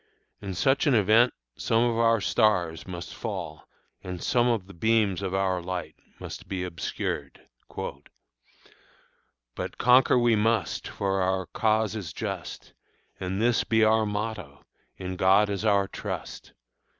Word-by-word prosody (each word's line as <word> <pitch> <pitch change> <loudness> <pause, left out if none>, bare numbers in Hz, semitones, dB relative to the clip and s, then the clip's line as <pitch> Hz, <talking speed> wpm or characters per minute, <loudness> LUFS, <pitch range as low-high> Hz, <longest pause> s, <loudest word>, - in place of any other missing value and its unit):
In 95 -2 -5
such 135 - +2
an 140 - +4
event 110 +4 +5 0.2
some 115 +1 +1
of 120 -1 +1
our 115 0 +3
stars 90 -6 +1
must 90 -2 -7
fall - - -6 0.4
and 90 -1 -6
some 120 +7 +2
of 115 -6 0
the 100 - -13
beams 105 0 +1
of 95 -1 -2
our 95 -2 0
light 90 0 -5 0.2
must - - -8
be 95 -2 -3
obscured. 85 -3 -4 2.1
"But - - -6
conquer 125 +1 +5
we 120 -2 +4
must, 110 -3 0
for 95 -1 -1
our 95 0 0
cause 110 0 +1
it - - -2
is 85 -6 -7
just, - - -6 0.5
And 95 +1 -3
this 120 +1 +2
be 110 -1 +2
our 110 0 +3
motto, 105 -8 -5 0.3
'In 90 -1 -5
God 100 +3 +4
is 100 0 -3
our 100 -2 +3
trust.' - - -7
100 Hz, 145 wpm, -27 LUFS, 95-115 Hz, 2.1 s, event